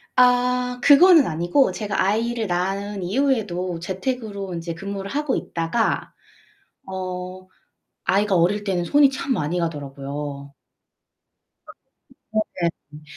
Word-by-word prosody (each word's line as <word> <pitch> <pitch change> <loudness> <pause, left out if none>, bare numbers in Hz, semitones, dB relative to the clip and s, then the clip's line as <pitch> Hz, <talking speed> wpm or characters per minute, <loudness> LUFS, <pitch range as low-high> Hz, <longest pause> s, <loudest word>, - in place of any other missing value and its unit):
아 250 0 +3
그거는 320 +2 +7
아니고 175 - +2
제가 210 -2 -2
아이를 225 +3 0
낳은 195 +2 -2
이후에도 190 -6 0
재택으로 200 +1 -4
인제 170 0 -4
근무를 195 +3 -6
하고 295 -2 0
있다가 170 +7 -1 0.8
어 185 0 -6 0.6
아이가 200 0 +2
어릴 185 +5 +2
때는 190 -4 -1
손이 285 - +5
참 270 0 -2
많이 170 -3 -1
가더라고요. 140 -2 -5 1.1
아 - - -46 0.9
네네. 150 -3 -4
195 Hz, 240 characters per minute, -22 LUFS, 170-240 Hz, 1.1 s, 그거는